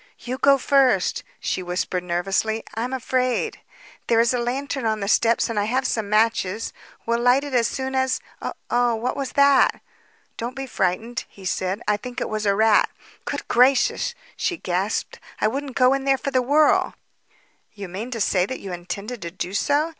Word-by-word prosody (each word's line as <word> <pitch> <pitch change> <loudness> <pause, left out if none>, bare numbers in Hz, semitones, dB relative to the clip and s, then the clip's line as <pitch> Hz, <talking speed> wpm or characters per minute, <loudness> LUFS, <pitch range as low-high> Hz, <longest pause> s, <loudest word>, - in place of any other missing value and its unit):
"You 250 +2 -5
go 280 0 +5
first," 260 -8 +3 0.2
she - - -2
whispered 180 0 -2
nervously. 195 +5 -1
"I'm 230 +4 -3
afraid. 255 -1 -1 0.5
There 230 -1 +3
is 235 +2 +3
a 250 - 0
lantern 265 +2 -2
on 220 -1 0
the 200 - -3
steps 230 +2 +3
and 230 -2 -1
I 205 - +1
have 255 +4 0
some 220 -5 -1
matches. 215 -1 +1 0.3
We'll 235 0 +1
light 245 +3 +4
it 285 -2 -6
as 235 -2 +3
soon 265 0 -4
as 260 0 +1 0.5
Oh, 240 -1 +3
what 240 +3 -2
was 275 -2 -4
that?" 280 -1 +4 0.6
"Don't 240 +2 -4
be 270 0 -4
frightened," 225 +1 -2
he 195 - -14
said. 185 +4 -2
"I 210 0 +2
think 245 +3 -7
it - - -3
was 215 -1 -2
a 200 - +3
rat." 220 0 +4 0.4
"Good - - -4
gracious!" 250 +2 +3 0.2
she 350 - -1
gasped. 190 - -2 0.2
"I - - +3
wouldn't 270 +3 -4
go 255 0 +5
in 275 0 -1
there 270 -1 +3
for 275 - -4
the 255 -1 +3
world." 290 +4 +3 0.8
"Do 205 - -13
you - - -4
mean 200 +7 -6
to 235 -3 -4
say 185 -3 +2
that 260 - -5
you 190 -2 -7
intended 200 +7 -6
to 170 - -4
do 180 +1 -5
so?" 290 +9 +1
235 Hz, 190 wpm, -23 LUFS, 205-260 Hz, 0.8 s, go